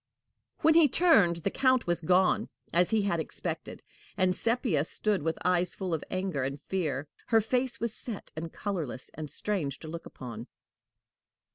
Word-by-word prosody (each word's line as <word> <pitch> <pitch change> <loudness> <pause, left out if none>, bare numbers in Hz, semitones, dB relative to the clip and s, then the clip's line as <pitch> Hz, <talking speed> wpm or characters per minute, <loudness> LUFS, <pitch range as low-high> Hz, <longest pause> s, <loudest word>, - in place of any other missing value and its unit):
When 320 +1 +6
he 325 -2 +7
turned, 255 - +5
the 195 - +1
Count 255 -2 +3
was 175 0 0
gone, 180 +3 +3 0.2
as 175 +1 +4
he 220 -2 +2
had 175 -4 +1
expected, 160 - -5 0.3
and 185 -2 +3
Sepia 230 - +1
stood 205 +3 -1
with 160 +2 -1
eyes 180 -1 +2
full 185 -3 -3
of 160 - -1
anger 185 -6 -1
and 135 +2 -3
fear. 150 -4 -2 0.2
Her 225 - +5
face 245 +2 0
was 235 -2 -2
set 220 -3 -7
and 165 +1 -5
colorless, 165 - -4
and 155 -1 -6
strange 155 -3 -2
to 160 - -10
look 165 +2 -6
upon. 120 -2 -8
180 Hz, 165 wpm, -29 LUFS, 160-220 Hz, 0.3 s, he